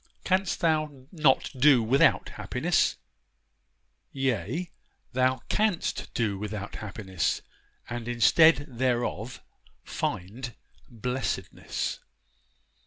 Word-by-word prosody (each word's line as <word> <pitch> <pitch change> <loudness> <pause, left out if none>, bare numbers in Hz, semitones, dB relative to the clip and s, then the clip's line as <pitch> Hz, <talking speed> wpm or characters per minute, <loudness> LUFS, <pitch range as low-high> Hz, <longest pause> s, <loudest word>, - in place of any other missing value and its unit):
Canst 190 0 +1
thou 155 -5 0
not 150 -6 +3
do 130 -2 +5
without 130 +5 +3
happiness? - - 0 1.1
Yea, 135 - -1 0.4
thou 130 0 +2
canst 210 -5 0
do 105 -4 0
without 105 -1 -5
happiness, 95 -4 -2 0.4
and 120 -1 -5
instead 135 +6 +5
thereof 120 -2 -2 0.4
find 115 +7 -4 0.3
blessedness. 125 +2 -3
125 Hz, 80 wpm, -28 LUFS, 110-145 Hz, 1.1 s, do